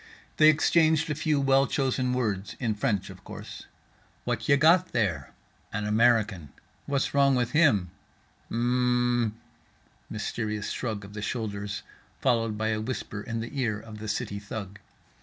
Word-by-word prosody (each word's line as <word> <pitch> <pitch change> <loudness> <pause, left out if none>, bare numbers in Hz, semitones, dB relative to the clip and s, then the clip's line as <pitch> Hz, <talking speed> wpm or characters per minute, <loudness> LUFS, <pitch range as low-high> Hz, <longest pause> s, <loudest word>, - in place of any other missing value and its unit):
They 155 0 +8
exchanged 160 0 +3
a - - +2
few 155 -1 0
well 135 0 +4
chosen 130 -2 0
words, 105 -6 -2
in 115 -3 0
French 105 -3 -1
of - - -14
course. - - -9 0.6
"What - - -2
ya 140 - +7
got 170 +5 +4
there?"—"An 105 - -3
American."—"What's 110 - 0
wrong 140 -1 +4
with 120 -1 0
him?"—"H 100 - -1
mmm" 120 -1 +2 0.8
mysterious 110 -1 -3
shrug 110 -5 -3
of 100 - -12
the 105 - -6
shoulders 105 -3 -3 0.4
followed 115 -3 +1
by 110 +1 0
a 110 -1 -1
whisper 110 -3 -4
in 115 0 -4
the 125 +5 -5
ear 110 -4 0
of 110 -1 -10
the 110 - -6
city 100 -1 -2
thug. 100 0 -7
115 Hz, 140 wpm, -27 LUFS, 105-135 Hz, 0.8 s, They